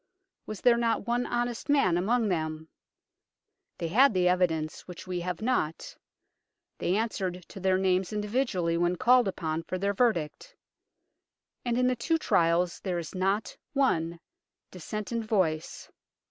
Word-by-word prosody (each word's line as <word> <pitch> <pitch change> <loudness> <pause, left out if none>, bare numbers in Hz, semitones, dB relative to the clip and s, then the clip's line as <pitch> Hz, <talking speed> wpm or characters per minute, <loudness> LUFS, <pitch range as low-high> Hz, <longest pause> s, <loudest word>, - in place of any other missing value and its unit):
Was 215 -3 -6
there 240 -1 +5
not 230 -1 0
one 240 +1 0
honest 240 +2 -2
man 275 -12 +3
among 220 +6 +1
them? 160 -2 -3 1.1
They 165 - -3
had 250 +5 +5
the 180 -1 +3
evidence, 165 -4 0
which 180 -2 -9
we 180 -1 -3
have 180 +3 -4
not; 220 -10 -1 0.8
they 180 - 0
answered 190 -5 -2
to - - -9
their 190 0 +2
names 190 0 +1
individually 210 -5 0
when 175 +1 +1
called 245 +4 +4
upon 160 -4 -2
for 185 +2 -4
their 200 +2 0
verdict; 195 -9 -1 1.1
and 240 -1 -1
in 250 - +2
the 255 0 +2
two 325 +8 0
trials 170 - +2
there 185 -3 -3
is 170 -2 -6
not 195 +3 -1 0.2
one 170 - +1 0.5
dissentient 215 +6 -4
voice. 180 -8 -1
190 Hz, 145 wpm, -28 LUFS, 170-235 Hz, 1.1 s, there